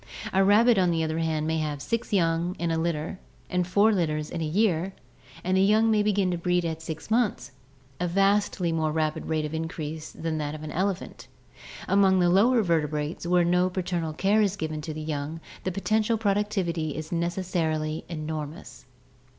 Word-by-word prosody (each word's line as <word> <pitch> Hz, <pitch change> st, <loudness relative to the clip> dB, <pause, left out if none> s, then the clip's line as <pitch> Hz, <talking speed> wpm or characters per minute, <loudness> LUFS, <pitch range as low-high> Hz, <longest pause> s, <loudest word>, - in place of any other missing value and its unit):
A 190 Hz, +1 st, +4 dB
rabbit, 215 Hz, +3 st, +5 dB
on 180 Hz, -1 st, +3 dB
the 165 Hz, -1 st, +1 dB
other 160 Hz, +1 st, -1 dB
hand, 160 Hz, -2 st, 0 dB
may 160 Hz, 0 st, 0 dB
have 150 Hz, -2 st, -2 dB
six 230 Hz, -, -3 dB
young 170 Hz, -2 st, +1 dB
in 170 Hz, -1 st, -1 dB
a 165 Hz, -, 0 dB
litter 165 Hz, +2 st, -2 dB, 0.3 s
and 180 Hz, -1 st, 0 dB
four 205 Hz, +4 st, +4 dB
litters 155 Hz, -5 st, -1 dB
in 170 Hz, -, -3 dB
a -, -, 0 dB
year, 190 Hz, 0 st, +1 dB, 0.5 s
and 185 Hz, +1 st, +1 dB
the 190 Hz, -, +4 dB
young 215 Hz, +3 st, +4 dB
may 215 Hz, -1 st, +3 dB
begin 200 Hz, -3 st, +1 dB
to 175 Hz, -, -2 dB
breed 180 Hz, 0 st, +1 dB
at 160 Hz, -1 st, -3 dB
six 160 Hz, +5 st, -7 dB
months, 225 Hz, -, +1 dB, 0.5 s
a 180 Hz, -, 0 dB
vastly 195 Hz, -1 st, +2 dB
more 160 Hz, -1 st, 0 dB
rapid 155 Hz, 0 st, -1 dB
rate 155 Hz, -1 st, 0 dB
of 150 Hz, -, -5 dB
increase 160 Hz, -1 st, -5 dB
than 160 Hz, -1 st, -3 dB
that 150 Hz, 0 st, -3 dB
of 155 Hz, -, -8 dB
the 155 Hz, -, -6 dB
elephant. 190 Hz, +1 st, -2 dB, 0.6 s
Among 190 Hz, 0 st, +4 dB
the 175 Hz, -1 st, +4 dB
lower 225 Hz, +5 st, +4 dB
vertebrates 155 Hz, -1 st, -1 dB
where 175 Hz, 0 st, +3 dB
no 180 Hz, +1 st, +3 dB
paternal 175 Hz, -3 st, -2 dB
care 200 Hz, +6 st, +2 dB
is 200 Hz, -2 st, +1 dB
given 155 Hz, -4 st, -4 dB
to 155 Hz, -, -5 dB
the 155 Hz, -, -5 dB
young 155 Hz, +1 st, -4 dB, 0.3 s
the 185 Hz, -, 0 dB
potential 215 Hz, +4 st, +1 dB
productivity 195 Hz, -7 st, -1 dB
is 155 Hz, +1 st, -6 dB
necessarily 165 Hz, -3 st, -1 dB
enormous. 155 Hz, +1 st, -6 dB
170 Hz, 185 wpm, -26 LUFS, 155-195 Hz, 0.6 s, rabbit